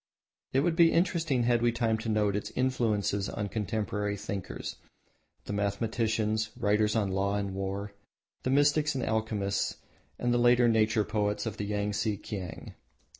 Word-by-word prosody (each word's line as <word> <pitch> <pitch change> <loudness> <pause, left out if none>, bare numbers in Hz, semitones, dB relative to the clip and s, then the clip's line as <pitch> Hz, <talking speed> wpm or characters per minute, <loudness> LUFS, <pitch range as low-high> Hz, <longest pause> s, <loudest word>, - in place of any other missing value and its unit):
It 135 - +3
would 165 +2 +1
be 170 -1 +6
interesting 165 -7 +1
had 120 0 +2
we 120 0 +3
time 115 -2 0
to 110 - -4
note 105 -2 +2
its 105 - -3
influence 120 -6 +1
on 100 0 -2
contemporary 105 -1 -2
thinkers, 100 -1 -5 0.7
the - - -4
mathematicians, 110 +1 0
writers 105 +1 +2
on 100 -4 +1
law 100 +1 0
and 100 -1 -2
war, 100 +1 -4 0.5
the - - -2
mystics 145 +2 +3
and 130 - -1
alchemists 110 -3 -1 0.4
and 120 0 0
the 120 - +3
later 120 0 +5
nature 110 -1 +3
poets 105 0 -1
of 110 -1 -4
the 105 - -3
Yangtse 105 0 -1
Kiang. 95 -4 -6
110 Hz, 155 wpm, -29 LUFS, 100-120 Hz, 0.7 s, be